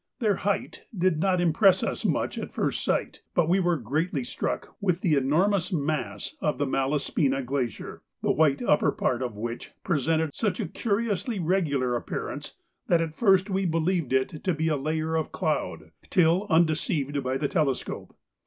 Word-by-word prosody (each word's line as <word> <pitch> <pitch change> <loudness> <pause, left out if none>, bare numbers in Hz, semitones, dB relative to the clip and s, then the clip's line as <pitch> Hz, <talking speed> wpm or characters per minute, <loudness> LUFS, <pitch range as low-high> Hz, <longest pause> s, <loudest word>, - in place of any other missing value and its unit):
Their 215 -6 +1
height 200 0 -2
did 180 -3 +2
not 185 +1 +2
impress 175 +3 +4
us - - -2
much - - 0
at - - -5
first - - -1
sight, - - -1
but 175 -3 +3
we 180 +3 +3
were 175 -2 +2
greatly 145 - -1
struck - - -4
with 180 -3 +1
the 165 - +2
enormous 170 +9 +2
mass 145 - -2
of 150 - 0
the 145 - 0
Malaspina 135 0 0
Glacier, 125 -4 -3 0.2
the - - +3
white 150 -3 +2
upper 150 - +3
part 125 0 -1
of 125 -4 -3
which 115 +2 -5
presented 160 -1 +1
such 205 -5 -1
a - - -1
curiously 210 -1 -1
regular 150 -8 +1
appearance 120 - -5 0.3
that 170 - +4
at 165 -2 -2
first 190 0 +4
we 190 +1 +1
believed 165 -3 0
it 130 +4 0
to 185 -3 +1
be 160 +1 0
a 155 - +2
layer 155 +3 -1
of 160 -1 -1
cloud, - - -2 0.2
till 180 +4 +3
undeceived 155 -4 +1
by 130 0 -1
the 145 - 0
telescope. 140 -5 -2
160 Hz, 170 wpm, -27 LUFS, 140-185 Hz, 0.3 s, impress